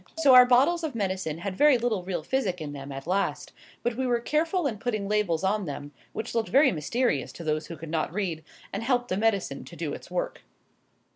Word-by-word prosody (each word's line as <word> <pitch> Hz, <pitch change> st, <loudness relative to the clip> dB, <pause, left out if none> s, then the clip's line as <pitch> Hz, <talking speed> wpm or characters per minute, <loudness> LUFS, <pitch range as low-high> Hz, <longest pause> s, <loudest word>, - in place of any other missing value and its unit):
So 290 Hz, -5 st, +6 dB
our 250 Hz, 0 st, +9 dB
bottles 280 Hz, +8 st, +4 dB
of 300 Hz, -6 st, -3 dB
medicine 185 Hz, -7 st, -2 dB
had 185 Hz, +2 st, -4 dB
very 290 Hz, +3 st, +5 dB
little 230 Hz, -5 st, 0 dB
real 175 Hz, -3 st, -3 dB
physic 195 Hz, -, -1 dB
in 150 Hz, -2 st, -5 dB
them 140 Hz, 0 st, -7 dB
at 135 Hz, 0 st, -7 dB
last; 180 Hz, -5 st, -1 dB, 0.3 s
but 240 Hz, 0 st, 0 dB
we 260 Hz, 0 st, 0 dB
were 240 Hz, -1 st, +2 dB
careful 325 Hz, +7 st, 0 dB
in 225 Hz, -7 st, -2 dB
putting 215 Hz, -4 st, -2 dB
labels 200 Hz, -5 st, +1 dB
on 200 Hz, +1 st, +1 dB
them, 145 Hz, -1 st, -6 dB, 0.2 s
which 220 Hz, -, -5 dB
looked 230 Hz, -1 st, 0 dB
very 275 Hz, +1 st, +5 dB
mysterious 170 Hz, -, 0 dB
to 170 Hz, -, -9 dB
those 155 Hz, 0 st, -1 dB
who 165 Hz, -, -7 dB
could 155 Hz, +1 st, -8 dB
not 160 Hz, -2 st, -1 dB
read, 175 Hz, -4 st, -2 dB, 0.3 s
and 200 Hz, -, -2 dB
helped 245 Hz, 0 st, 0 dB
the 185 Hz, -, 0 dB
medicine 215 Hz, -2 st, 0 dB
to -, -, -12 dB
do -, -, -3 dB
its -, -, -9 dB
work. -, -, -3 dB
210 Hz, 220 wpm, -27 LUFS, 165-250 Hz, 0.3 s, our